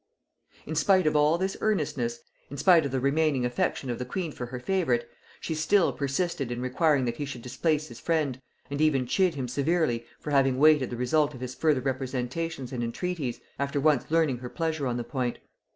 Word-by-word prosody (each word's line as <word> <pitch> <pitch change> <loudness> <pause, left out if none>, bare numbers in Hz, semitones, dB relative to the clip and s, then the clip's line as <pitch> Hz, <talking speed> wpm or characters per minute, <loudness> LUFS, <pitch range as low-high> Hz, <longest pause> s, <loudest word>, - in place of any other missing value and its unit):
In 155 - -5
spite 185 +3 +3
of 155 - +2
all 150 +2 +4
this 190 +2 -1
earnestness, 140 - -1 0.3
in 140 - -7
spite 165 +1 +5
of - - -7
the 130 - 0
remaining 140 -1 +1
affection 125 +2 -1
of 120 - -4
the - - -2
queen 160 +6 -3
for 125 -3 -6
her 125 +1 -6
favorite, 125 -7 0 0.3
she 160 - -3
still 165 +4 +3
persisted 140 -1 -2
in 120 - -3
requiring 130 +2 +2
that 120 -1 -2
he 145 - -3
should 125 -4 -7
displace 150 +4 0
his 120 -2 -11
friend, 150 -6 -1 0.3
and 145 +1 -2
even 140 -5 +3
chid 180 +6 +2
him 130 -3 -3
severely 135 -3 0
for 150 - -6
having 135 -2 +3
waited 150 -2 +5
the 120 - -5
result 145 +4 +1
of 125 - -10
his 125 0 -4
further 150 -1 +2
representations 130 +2 -3
and 120 -2 -2
entreaties, 140 +1 -3 0.2
after 140 0 -1
once 145 -3 +2
learning 155 -6 +2
her 125 0 -7
pleasure 160 -3 -2
on 120 -1 -1
the 120 - -2
point. 125 -2 -2
140 Hz, 200 wpm, -27 LUFS, 125-160 Hz, 0.3 s, spite